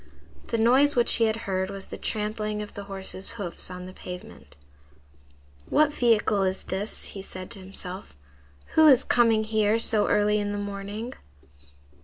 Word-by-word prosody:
The 230 - -1
noise 260 +6 +4
which 240 -1 +5
he 230 - +3
had 220 +1 -1
heard 190 -1 -1
was 195 -1 -6
the - - -8
trampling 215 0 -2
of 210 - -11
the 200 - -7
horse's 195 0 -4
hoofs 200 -7 -5
on 180 0 -7
the 185 - -10
pavement. 180 - -10 1.1
"What 300 -1 +3
vehicle 220 -5 +2
is 190 0 -1
this?" 195 +3 -4
he 195 - -6
said 185 -1 -8
to 205 - -4
himself. 185 - -8 0.6
"Who 315 0 +7
is 265 -3 +7
coming 230 -3 +3
here 215 0 +2
so 225 -2 +2
early 210 0 +3
in 205 0 -2
the - - -3
morning?" 205 +4 -5
210 Hz, 165 wpm, -26 LUFS, 195-225 Hz, 1.1 s, Who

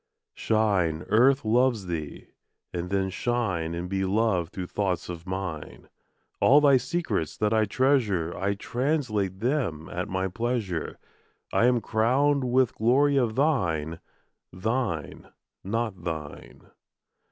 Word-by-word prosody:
Shine, 95 -7 +1
Earth 125 +5 +4
loves 120 -2 +2
thee! 80 -4 -6 0.4
And 90 0 -3
then 95 0 0
shine 95 -8 -1
And 85 +1 -4
be 95 +1 -1
loved 95 -3 +1
through 95 - -5
thoughts 90 -3 -2
of 85 0 -7
mine. 90 -5 -6 0.5
All 140 +3 +6
thy 140 -3 +5
secrets 120 - -2
that 105 0 +1
I 110 -1 +3
treasure 105 - +1
I 100 +1 -1
translate 110 - -1
them 115 - -1
at 90 +1 -4
my 95 +1 -1
pleasure. 105 -4 -3 0.6
I 115 - +4
am 125 -2 +2
crowned 130 +7 +2
with 125 0 +2
glory 140 +5 +3
of 120 -4 +1
thine. 85 - 0 0.5
Thine, 100 - -3 0.3
not 105 -3 -3
thine. 80 -4 -6
105 Hz, 125 wpm, -26 LUFS, 90-125 Hz, 0.6 s, All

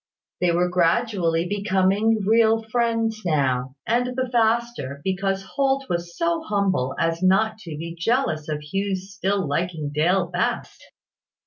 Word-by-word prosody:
They 180 -1 +2
were 175 +1 +2
gradually 175 -1 +1
becoming 205 +2 +1
real 225 +1 +4
friends 225 -1 0
now; 130 -5 0
and 245 +2 +1
the 255 -1 -1
faster, 230 - 0
because 195 0 -1
Holt 275 +5 0
was 170 0 -3
so 335 -1 0
humble 195 - 0
as 165 +1 0
not 215 +4 +2
to 165 -7 -8
be 165 +2 -6
jealous 170 - 0
of 150 -1 -2
Hugh's 195 +4 -3
still 195 -2 -1
liking 155 0 -2
Dale 175 +5 +2
best. 175 +1 -3
195 Hz, 135 wpm, -23 LUFS, 170-225 Hz, -, real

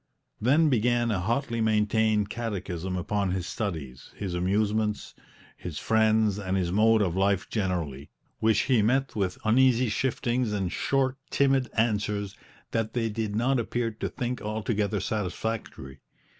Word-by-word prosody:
Then 145 +8 +4
began 120 -2 +2
a 100 - 0
hotly 115 +4 -1
maintained 110 -1 +2
catechism 95 -5 -3
upon 100 +2 -1
his 95 -2 -2
studies, 80 - -5
his 95 -3 -4
amusements, 105 +4 0 0.4
his 85 -4 -7
friends 110 +3 +2
and 95 -1 -1
his 90 -2 0
mode 110 +2 +4
of 90 -3 -1
life 95 0 +1
generally, 85 - -2 0.3
which 110 -2 +3
he 125 -5 +3
met 130 +5 +1
with 95 -4 -1
uneasy 125 +2 +4
shiftings 120 -1 0
and 95 -4 -1
short, 135 +2 0
timid 135 -2 +2
answers 105 -3 0 0.4
that 115 -1 -1
they 115 -2 0
did 105 -1 -3
not 125 +4 +2
appear 115 0 -1
to 110 - -4
think 125 0 -4
altogether 105 -1 -1
satisfactory. 95 -8 -4
110 Hz, 140 wpm, -27 LUFS, 95-115 Hz, 0.4 s, Then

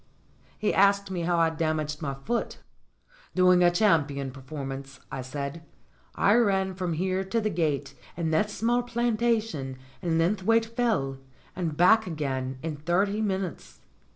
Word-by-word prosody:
He 210 - 0
asked 200 0 +3
me 180 -2 -2
how 170 +1 +1
I'd 165 -1 +2
damaged 155 -2 -1
my 140 -3 -3
foot. 230 - -3 0.8
"Doing 180 -1 +5
a 175 - +7
champion 145 -8 +1
performance," 135 0 -7
I 130 - -4
said. 140 +4 -5 0.5
"I 200 - +4
ran 195 -5 +2
from 180 -2 -2
here 185 +3 0
to 230 +5 0
the 215 -1 -1
gate 150 -5 -1 0.2
in 165 -2 -1
that 185 +7 +2
small 235 +3 +1
plantation 225 - -1 0.2
in 170 -3 0
Linth 180 +5 +1
waite 225 +3 +3
Fell 225 - -1 0.4
and 165 -5 -3
back 220 +4 +5
again 135 -5 -3
in 160 -2 -3
thirty 190 +7 +1
minutes." 190 -4 -3
175 Hz, 150 wpm, -27 LUFS, 145-205 Hz, 0.8 s, a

